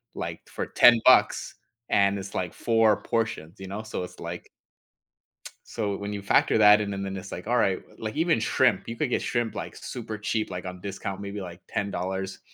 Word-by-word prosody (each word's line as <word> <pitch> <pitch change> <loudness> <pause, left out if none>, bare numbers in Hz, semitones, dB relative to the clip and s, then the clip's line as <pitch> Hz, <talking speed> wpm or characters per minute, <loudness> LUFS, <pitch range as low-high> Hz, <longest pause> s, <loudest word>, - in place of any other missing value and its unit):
like, - - -5
for - - -4
10 120 -1 +6
bucks 130 - +4 0.3
and 100 0 +3
it's, 95 0 -8
like, 90 -2 -2
4 115 -2 +3
portions, 105 -7 -2
you 95 - -7
know, 100 +3 -5
so, 105 -4 -4
it's 90 - -10
like - - -7 1.2
So, 105 -3 -2
when 100 +1 -5
you 100 -1 -5
factor 100 - +3
that 105 0 +7
in, 100 -1 -2
and 100 0 -3
then 95 0 -4
it's 95 +1 -8
like, 90 - -6
"All 120 +2 +1
right," 95 -5 +2
w - - -21
like, 110 +2 -4
even 165 -5 +2
shrimp, - - +2
you 115 - -4
could 140 +1 -1
get - - 0
shrimp, 120 -2 -1
like, - - -6
super 110 -3 -6
cheap, 110 +1 -2
like 90 0 -5
on 90 0 -7
discount, 100 0 -5
maybe, 100 0 -5
like, 90 -1 -8
$10, 95 -1 -3
100 Hz, 205 wpm, -26 LUFS, 95-110 Hz, 1.2 s, that